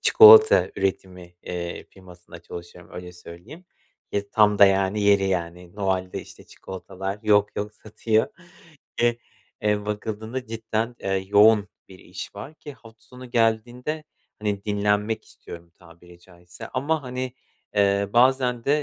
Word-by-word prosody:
çikolata 440 +1 +8
üretimi, 90 -2 -4
eee, 85 -1 -6
firmasında 90 -2 -15
çalışıyorum, 85 +1 -11
öyle 90 0 -8
söyleyeyim. 90 - -13 0.5
Ye 100 0 -2
tam 105 -1 +3
da, 100 - +9
yani, 95 +1 +2
yeri, 100 -1 +4
yani, 90 -1 -3
Noel'de, 95 -2 -2
işte, - - -14
çikolatalar 95 +1 -7
yok 105 -1 +2
yok 105 +1 -4
satıyor. 110 +1 -1 0.8
E 120 0 +2 0.4
eee, 105 0 0
bakıldığında 110 +4 -5
cidden, 115 +1 -3
eee, 95 - -3 0.2
yoğun 105 0 +5 0.2
bir 95 - -14
iş 90 0 -9
var 110 +10 -9
ki 150 -2 -11
hafta 115 -4 -18
sonu 125 0 -13
geldiğinde, 120 +6 -1 0.3
hani, 105 -2 -3
dinlenmek 105 +1 0
istiyorum, 85 0 -13
tabiri 85 0 -18
caizse. 85 -1 -13
Ama, 145 +4 -1
hani, 125 0 -5 0.4
eee, 100 -1 +2
bazen 125 -1 +2
de 150 +1 +2
105 Hz, 135 wpm, -24 LUFS, 95-115 Hz, 0.8 s, da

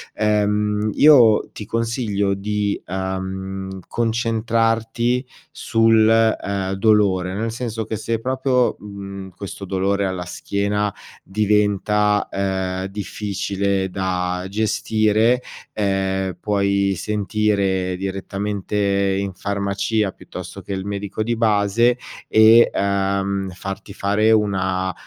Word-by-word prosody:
Ehm, 105 0 +1
io 125 -8 +6
ti 105 - -7
consiglio 115 -4 -1
di, 105 +1 -2
uhm, 95 +1 -4
concentrarti 115 +1 0 0.3
sul, 115 -1 +3
ehm, 100 -4 +1
dolore, 95 -3 +2
nel 115 +2 -2
senso 115 -1 -4
che 110 - -4
se 110 +1 -2
proprio, 130 +1 +1
mhmm, 100 -1 -8
questo 100 0 -7
dolore 95 +1 0
alla 90 -1 -4
schiena 100 +4 -1 0.3
diventa, 105 0 +1
ehm, 95 -1 -2
difficile 100 0 -4 0.2
da 90 -1 -2
gestire, 110 +2 +2 0.3
ehm, 95 -2 -1
puoi 100 -1 +1
sentire 100 -2 0
direttamente 100 +1 -3 0.4
in 100 -1 -3
farmacia 100 +2 -1
piuttosto 90 +2 -9
che - - -9
il 95 0 -4
medico 100 +1 -4
di 115 +2 0
base, 115 +2 +2 0.3
e, 110 +2 +7
uhm, 100 0 0
farti 95 +2 -7
fare 105 +2 +2
una 95 -3 +1
100 Hz, 100 wpm, -21 LUFS, 95-110 Hz, 0.4 s, e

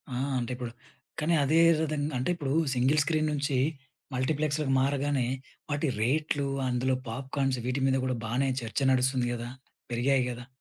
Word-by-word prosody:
ఆ! - - -2 0.2
అంటే 120 0 -3
ఇప్పుడు 125 -1 -5 0.5
కానీ 160 +2 +1
అదే 155 +4 +3 0.2
విధంగా 150 -1 -1
అంటే 125 - -1
ఇప్పుడు 140 -5 -2 0.2
సింగిల్ 130 +4 +3
స్క్రీన్ 155 0 +1
నుంచి 140 -2 0 0.6
మల్టీప్లెక్స్‌లకి 145 +1 0
మారగానే 140 -1 +1 0.4
వాటి 145 +2 0
రేట్లు 145 +3 +1 0.2
అందులో 130 +1 +1
పాప్‌కాన్స్ 135 +2 -1
వీటి 125 +2 0
మీద 135 0 +3
గూడా 130 -1 -1
బానే 125 +5 +1
చర్చ 115 +2 -3
నడుస్తుంది 130 -1 +2
గదా! 120 0 -5 0.4
పెరిగాయి 130 +2 +2
గదా! 120 0 -7
135 Hz, 145 wpm, -29 LUFS, 125-145 Hz, 0.6 s, అదే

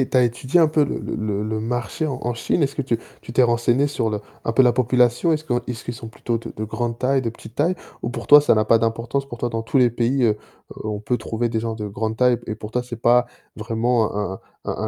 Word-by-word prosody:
et - - -2
tu - - +1
as - - +5
étudié 130 +7 +1
un 160 - +5
peu 155 -1 +3
le 145 - -3
le - - -5
le 105 -1 -2
le 110 0 -2
marché 120 +5 -2
en 135 -4 -3
en 120 0 -1
Chine? 115 +7 0
Est-ce 140 -1 0
que - - -1
tu 120 -4 0 0.2
tu - - -9
t'es 125 - +4
renseignée 120 +3 +3
sur 115 -6 -1
le 105 -1 -2 0.2
un 115 - 0
peu 130 - +5
la 125 -1 +5
population? 125 +5 +3
Est-ce 155 0 -1
qu'on 120 -5 0
est-ce 120 -2 -5
qu'ils 120 - -4
sont 115 -1 -8
plutôt 115 +1 -3
de 115 - -7
de 110 - -4
grande 115 +1 -3
taille? 135 +1 +2
De 115 - -1
petite 115 0 -13
taille? 165 +7 +2 0.3
Ou 120 - -2
pour 120 -2 -6
toi 145 0 +9
ça 150 - +4
n'a 110 0 +2
pas 115 +1 +5
d'importance? 115 +5 -1
Pour 120 -3 -8
toi 120 - -1
dans 115 -1 -3
tous 130 +4 +1
les 125 - +6
pays, 120 +3 +1
heu, 115 - +5 0.5
heu, - - -7
on 105 -1 -3
peut 120 +3 0
trouver 120 0 -2
des 110 -1 -1
gens 115 0 -3
de 105 -1 -5
grande 110 +2 -3
taille 125 -1 +4
p - - -10
et - - -2
pour 105 0 -8
toi 125 +2 -1
c'est 120 -2 -8
pas 120 +1 +4 0.3
vraiment 115 +1 0
un 100 -2 -2 0.3
un - - -2
un - - -4
120 Hz, 290 wpm, -22 LUFS, 115-125 Hz, 0.5 s, toi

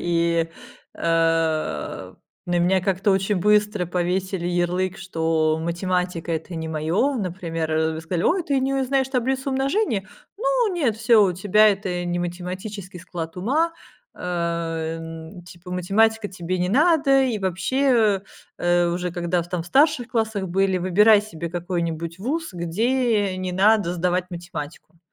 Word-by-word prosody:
и, 170 -1 +1 0.5
а, 165 -1 0 0.3
на 175 0 +1
меня 185 +2 +3
как-то 195 +2 +1
очень 195 +1 +1
быстро 210 0 +2
повесили 180 +1 -1
ярлык, 180 +1 0
что 160 -3 0
математика- 175 0 -2
это 165 +2 -4
не 160 0 -4
моё. 165 - 0
Например, 170 -5 -3
а, 160 0 +1
в - - -5
сказали: 165 +1 -2
"Ой, 360 +1 +2
ты 275 -3 +1
не 270 +1 0
у 270 -1 +1
знаешь 265 0 +1
таблицу 265 +1 -1
умножения? 270 - 0 0.3
Ну - - +1
нет, 265 -11 0
всё, 220 -1 +5
у 185 - +1
тебя, 205 +4 +4
это, 190 -3 -1
не 175 0 -1
математический 180 +2 -6
склад 165 -1 -6
ума". 300 - +1 0.4
Ам, 165 0 -4
типа 175 +1 -12
математика 210 +4 +2
тебе 185 0 -4
не 180 0 0
надо. 280 - +4
И 235 -4 -1
вообще, 205 +2 +1 0.4
а 175 0 +2
уже 180 0 -3
когда 175 0 0
в 170 - -13
там 175 -2 -2
в - - -13
старших 270 - +3
классах 220 -5 -1
были: 190 +1 +1
"Выбирай 205 +4 +5
себе 170 -5 -6
какой-нибудь 170 -1 -3
ВУЗ, 315 +10 -3
где 210 +3 0
не 185 -1 -3
надо 200 -1 +3
сдавать 180 +1 0
математику", 170 -2 -8
185 Hz, 145 wpm, -23 LUFS, 170-220 Hz, 0.5 s, всё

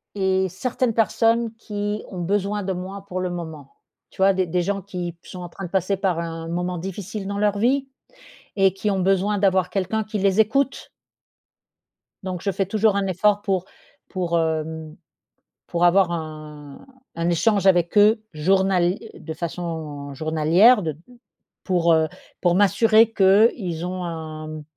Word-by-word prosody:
et 190 -1 +1
certaines 235 +5 -2
personnes 230 +1 +2
qui 205 -1 -4
ont 185 -2 -6
besoin 205 +3 -1
de 190 0 -2
moi 190 +2 -7
pour 185 -1 -3
le 185 - -2
moment. 160 -5 -8 0.3
Tu - - -22
vois, 195 +1 +5
des 185 -1 0
des 180 +2 0
gens 195 +2 -2
qui 180 -3 -6
sont 180 - -10
en 175 - -7
train 195 - -8
de - - -12
passer 190 +1 0
par 190 -3 0
un 165 -1 -5
moment 180 +1 -2
difficile 195 +3 -6
dans 200 0 -3
leur 205 -1 +1
vie 270 +5 +1 0.7
et 195 -2 +3
qui 200 +2 -2
ont 195 -2 0
besoin 195 +2 +1
d'avoir 190 -2 +2
quelqu'un 200 +3 -1
qui 215 0 -5
les 195 +1 +1
écoute. 270 +6 +1 1.3
Donc, 185 -2 -5
je 200 - 0
fais 195 0 -1
toujours 215 0 +2
un 200 -1 0
effort 205 +3 +2
pour 190 -3 -1 0.4
pour, 175 -3 -1
hem 160 -1 -3 0.7
pour 175 0 +1
avoir 180 0 +4
un 155 - -8 0.3
un 170 +1 -1
échange 195 +3 +2
avec 175 +1 +3
eux 215 +1 +5
journal 185 +2 +2 0.2
de 160 0 -8
façon 160 -4 -5
journalière, 160 - +4
de 155 -4 -4 0.7
pour, 170 -2 +2
heu 160 -1 +3 0.3
pour 175 -1 +3
m'assurer 220 +3 +4
qu'ils 190 -4 +3
ont 180 0 -4
un 155 -2 -6
185 Hz, 160 wpm, -23 LUFS, 170-205 Hz, 1.3 s, vois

